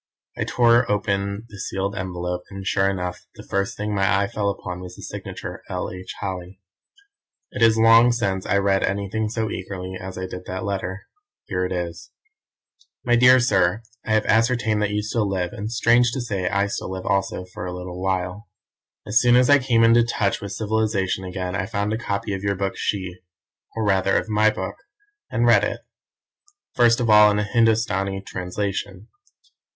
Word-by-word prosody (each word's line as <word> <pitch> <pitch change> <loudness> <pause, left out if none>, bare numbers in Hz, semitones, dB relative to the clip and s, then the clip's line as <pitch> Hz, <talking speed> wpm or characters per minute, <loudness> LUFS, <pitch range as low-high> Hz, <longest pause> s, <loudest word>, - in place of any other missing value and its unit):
I - - -2
tore 120 -1 +3
open 100 0 -1
the 105 -3 -12
sealed 100 +1 -3
envelope, 90 -2 -3
and 95 -1 -8
sure 95 0 +2
enough 90 -2 -4
the - - -11
first 100 0 -1
thing 105 0 -3
my 100 0 +2
eye - - +1
fell 100 0 -1
upon 90 -2 -5
was 90 0 -9
the - - -12
signature, - - -7
L. - - -3
H. 90 0 -8
Holly. 95 -1 -5 0.9
It - - -6
is 115 -1 +5
long 115 +2 +6
since 100 -5 -1
I 100 - +2
read 100 -1 +2
anything 100 +2 -1
so 110 0 -2
eagerly 95 -1 -6
as 95 0 -7
I 95 - -3
did 90 0 -8
that 95 0 -4
letter. 95 -1 -3 0.4
Here 90 -1 -1
it 90 - -4
is: 85 -2 -4 1.0
"My 120 -1 +4
dear 125 +1 +7
Sir, 105 -3 +2 0.2
I 110 - -1
have 110 0 +2
ascertained 115 -1 +2
that 105 - +1
you 105 0 -1
still 110 -1 -1
live, 90 -2 -2
and 105 +2 -5
strange 120 +1 +3
to 135 - -2
say 100 -6 -2
I 100 0 +1
still 100 - -4
live 95 0 -6
also 95 -2 -1
for 90 0 -7
a - - -4
little 90 0 -7
while. 95 +2 -2 0.6
"As 105 +2 +3
soon 120 0 +5
as 125 +2 +5
I 145 - +7
came 120 -3 +2
into 115 +1 +6
touch 105 -4 -1
with 100 - -6
civilization 105 -2 -1
again 90 0 -4
I 100 -1 -2
found 105 0 -1
a - - -1
copy 100 -2 -3
of 95 - -4
your 100 0 0
book 95 0 -2
She, 95 -3 -3 0.6
or 110 -1 -1
rather 95 -1 +2
of - - -2
my 110 0 +4
book, - - -5 0.5
and - - +1
read - - +5
it - - -2 0.9
first 120 -1 +4
of 120 - 0
all 105 -1 +7
in 105 - +1
a 105 - +1
Hindostani 105 -3 +1
translation. 95 +2 -4
100 Hz, 190 wpm, -23 LUFS, 95-110 Hz, 1.0 s, dear